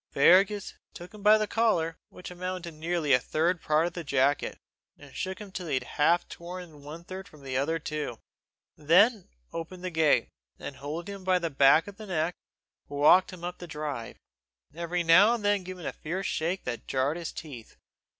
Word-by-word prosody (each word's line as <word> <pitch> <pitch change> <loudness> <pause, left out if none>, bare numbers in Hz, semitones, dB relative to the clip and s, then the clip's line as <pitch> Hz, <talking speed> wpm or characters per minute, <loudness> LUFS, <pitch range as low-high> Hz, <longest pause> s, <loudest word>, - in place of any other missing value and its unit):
Fergus 190 +7 +4 0.2
took 175 +2 -10
him 210 - -11
by 210 +1 +7
the 215 - 0
collar, 205 -8 +1
which 180 - -10
amounted 180 0 -5
to 170 - -6
nearly 165 -3 +1
a 125 - +6
third 165 +6 0
part 155 +1 +2
of 175 - -3
the 170 - -5
jacket, 140 0 +1 0.4
and 140 -2 -15
shook 190 0 -3
him 205 -2 -10
till 185 -2 -6
he 150 - 0
had 130 - -1 0.2
half 170 +3 +4
torn 175 0 -8
that 155 +4 -10
third 190 +2 -8
from 150 -6 -17
the 130 -1 -5
other 145 +5 +1
two; 150 -6 -4 0.6
then 195 +7 +4 0.2
opened 175 +2 -6
the 185 - -3
gate, 160 -2 +3 0.3
and, 135 - -8
holding 160 +7 -5
him 195 -1 -10
by 185 0 +3
the 170 -2 -3
back 140 +3 +5
of 205 -1 -11
the 215 -1 -9
neck, 170 -1 0 0.5
walked 150 +6 +4
him 180 -2 -11
up 180 0 -5
the 175 - -8
drive, 150 -7 -5 0.6
every 170 +2 -2
now 190 +8 +6
and 215 -3 -6
then 205 -2 +2
giving 185 -1 -8
him - - -1
a - - -8
fierce 185 +5 -4
shake 175 +4 -1
that 120 -2 -5
jarred 135 +3 0
his 170 -2 -5
teeth. 135 -8 -10
170 Hz, 200 wpm, -28 LUFS, 150-185 Hz, 0.6 s, by